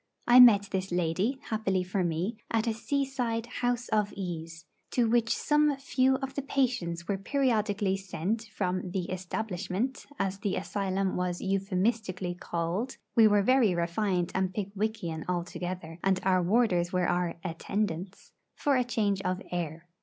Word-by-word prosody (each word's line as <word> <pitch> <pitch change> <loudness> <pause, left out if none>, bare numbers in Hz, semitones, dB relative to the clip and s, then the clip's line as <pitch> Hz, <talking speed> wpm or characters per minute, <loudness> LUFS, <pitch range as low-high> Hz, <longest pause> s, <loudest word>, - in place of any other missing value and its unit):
I 245 +1 +8
met 205 -5 +8
this 190 -1 -2
lady, 180 +9 0
happily 195 -4 0
for 185 +1 -1
me, 175 +6 -1
at 225 -1 +1
a 230 - +1
seaside 250 -2 -1 0.2
'house 245 0 0
of 210 -1 +1
ease,' 165 -4 -6 0.2
to 240 -2 +2
which 230 0 +2
some 295 -1 +2
few 265 -1 +2
of 270 0 -4
the 280 - -2
patients 240 -12 -1
were 195 -1 -1
periodically 210 -5 +1
sent 195 +4 -3
from 185 -1 -1
the 180 -1 -3
'Establishment,' 190 +5 -3
as 195 -2 -1
the 200 -1 -1
asylum 195 +1 -1
was 180 -1 -1
euphemistically 195 -1 -1
called 175 +7 -3 0.2
(we 225 -2 +7
were 205 -1 +4
very 240 -5 +4
refined 175 +1 0
and 190 -1 0
Pickwickian 200 -5 -3
altogether, 175 -1 -4
and 190 -1 +2
our 185 -1 +3
warders 180 -3 +2
were 180 -1 +1
our 175 -1 0
'attendants'), 185 +1 -3 0.2
for 275 -3 +2
change 210 -5 0
of 185 -1 -1
air. 170 -1 -4
195 Hz, 145 wpm, -29 LUFS, 180-230 Hz, 0.2 s, I